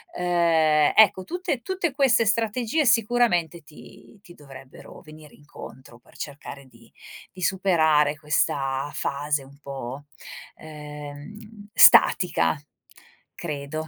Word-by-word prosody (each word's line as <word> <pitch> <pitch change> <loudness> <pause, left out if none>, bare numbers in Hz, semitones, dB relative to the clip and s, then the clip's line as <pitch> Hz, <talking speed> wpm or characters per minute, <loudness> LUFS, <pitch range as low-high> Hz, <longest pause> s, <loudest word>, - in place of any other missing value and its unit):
ehm, 165 -4 +2
ecco 200 -3 +5
tutte 350 - -4
tutte 370 +1 -3
queste 265 -5 +2
strategie 230 +7 -1
sicuramente 225 - +1
ti 155 +7 -17
ti 175 - -15
dovrebbero 135 -3 -14
venire 155 -1 -16
incontro 130 -4 -14
per - - -25
cercare 140 -1 -9
di 115 -3 -22 0.4
di 185 - -13
superare 160 -5 +1
questa 140 -2 -2
fase 145 0 -3
un 140 +1 -18
po', 135 0 -8 0.5
ehm, 150 +3 -11 0.4
statica, 180 -3 +5 0.8
credo. 155 0 -6
155 Hz, 105 wpm, -23 LUFS, 145-205 Hz, 0.8 s, ecco